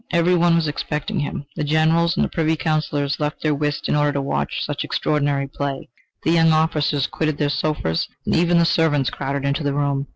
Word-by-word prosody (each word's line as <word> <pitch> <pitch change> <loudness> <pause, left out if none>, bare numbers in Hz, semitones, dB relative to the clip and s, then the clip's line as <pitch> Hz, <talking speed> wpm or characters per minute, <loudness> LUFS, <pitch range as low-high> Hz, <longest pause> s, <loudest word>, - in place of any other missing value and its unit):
Every 170 +1 +2
one 175 -1 +4
was 165 -2 +1
expecting 150 +6 -3
him. 145 -1 -4
The 155 - -2
generals 160 +3 +2
and - - +1
Privy 160 0 +1
Counsellors 150 -3 -1
left 150 0 -3
their 155 -1 +2
whist 145 0 -2
in - - +1
order 145 -1 +2
to 140 - -1
watch 70 - -2
such - - -3
extraordinary 145 -2 0
play. 140 -1 -4 0.3
The 160 - +2
young 165 -1 +4
officers 150 -3 +1
quitted 155 0 -2
their 145 -1 0
sofas, 145 - -1 0.2
and - - +1
even 175 +1 +3
the 170 - +4
servants 160 -5 +2
crowded 140 0 -3
into 140 +3 0
the 140 -1 -1
room. 140 -1 -1
150 Hz, 200 wpm, -21 LUFS, 140-160 Hz, 0.3 s, one